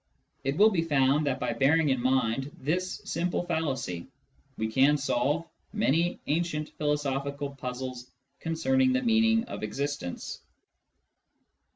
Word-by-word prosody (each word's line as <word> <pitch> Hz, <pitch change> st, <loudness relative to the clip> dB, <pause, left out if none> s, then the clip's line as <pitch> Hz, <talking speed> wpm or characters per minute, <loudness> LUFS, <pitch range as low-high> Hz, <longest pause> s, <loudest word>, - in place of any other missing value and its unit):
It 135 Hz, +2 st, -1 dB
will 215 Hz, +3 st, +7 dB
be 180 Hz, -5 st, +1 dB
found 145 Hz, -1 st, +2 dB
that 130 Hz, -1 st, 0 dB
by -, -, -1 dB
bearing 145 Hz, +6 st, +3 dB
in 130 Hz, -2 st, +1 dB
mind 130 Hz, +1 st, +1 dB
this 180 Hz, +7 st, -2 dB
simple 175 Hz, +2 st, -1 dB
fallacy 135 Hz, -, -2 dB, 0.5 s
we 110 Hz, -, -1 dB
can 135 Hz, +6 st, +4 dB
solve 145 Hz, +3 st, 0 dB, 0.3 s
many 175 Hz, -4 st, +1 dB
ancient 155 Hz, -1 st, -1 dB
philosophical 140 Hz, -1 st, -1 dB
puzzles 125 Hz, -1 st, -6 dB, 0.3 s
concerning 260 Hz, +11 st, +2 dB
the 255 Hz, 0 st, +1 dB
meaning 225 Hz, -1 st, +4 dB
of -, -, -7 dB
existence. 135 Hz, -2 st, -4 dB
145 Hz, 125 wpm, -28 LUFS, 130-170 Hz, 0.5 s, will